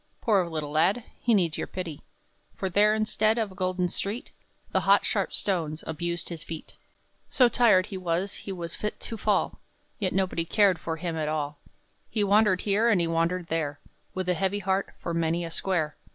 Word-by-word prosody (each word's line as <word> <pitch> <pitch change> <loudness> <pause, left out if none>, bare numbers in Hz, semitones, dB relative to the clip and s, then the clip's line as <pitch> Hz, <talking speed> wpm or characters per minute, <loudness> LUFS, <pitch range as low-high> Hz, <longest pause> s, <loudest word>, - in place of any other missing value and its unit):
Poor 195 -6 +2
little 155 -3 -4
lad! 175 +10 +2 0.2
he 240 - +1
needs 170 -5 +1
your - - -2
pity; 170 -5 -5 0.5
For 190 - -3
there, 210 +3 +4
instead 215 +1 +2
of 220 -4 -1
a - - -11
golden 185 -1 0
street, 200 +6 -4 0.4
The - - +3
hot, - - +4
sharp - - 0
stones 165 -6 -1
abused 170 +2 -3
his 165 -3 -6
feet. 160 -1 -8 0.5
So 250 - +5
tired 220 -6 +4
he 200 -2 -6
was 185 +2 -1
he 200 - -7
was 170 -3 -5
fit 210 - -4
to 230 - -4
fall, - - 0 0.4
Yet 190 -4 0
nobody 185 -3 0
cared 190 +1 +3
for 160 - -3
him 170 0 -3
at 155 -1 -1
all; 150 -1 -2 0.5
He 215 - 0
wandered 205 -2 +4
here, 210 +3 +2
and 210 -5 +4
he 170 - +2
wandered 165 +2 0
there, 150 -3 -1 0.4
With 185 -1 -2
a 180 - +3
heavy 190 +3 0
heart, 195 0 -1
for 170 - -4
many 165 +1 0
a 165 - -6
square. 165 -4 -1
185 Hz, 195 wpm, -27 LUFS, 165-200 Hz, 0.5 s, So